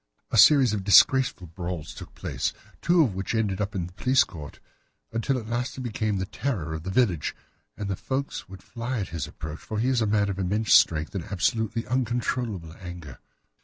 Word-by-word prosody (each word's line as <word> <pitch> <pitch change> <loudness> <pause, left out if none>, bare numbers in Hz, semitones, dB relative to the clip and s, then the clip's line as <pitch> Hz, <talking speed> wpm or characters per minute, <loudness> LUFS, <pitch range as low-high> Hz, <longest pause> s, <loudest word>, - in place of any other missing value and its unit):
A - - +1
series 130 0 +7
of 100 -2 -2
disgraceful 115 +1 +5
brawls 85 -1 -6
took - - -11
place, - - -2 0.3
two 170 0 +4
of 120 -9 0
which 95 +4 -3
ended 105 -3 0
in 100 -3 -2
the 90 - -11
police 130 +7 +3
court, 75 -4 -10 0.5
until 115 +4 0
at 115 - -5
last 120 +3 -3
he 130 - -6
became 110 -4 -1
the 95 - -2
terror 95 - -3
of 80 - -4
the 95 - -6
village, 95 - +1 0.4
and 105 - -4
the 100 - -1
folks 135 0 -4
would 95 0 -11
fly 120 +2 -4
at 95 - -4
his 85 -1 -4
approach, 80 0 -7
for 110 - -6
he 120 +4 +1
is 125 -3 +2
a 110 - +1
man 105 -1 +2
of 100 -1 -3
immense 105 +4 +1
strength, 80 -1 +4
and 95 -5 -4
absolutely 110 +4 -1
uncontrollable 120 -6 -2
in 80 - -14
his - - -16
anger. 85 -7 -9
105 Hz, 205 wpm, -26 LUFS, 90-120 Hz, 0.5 s, series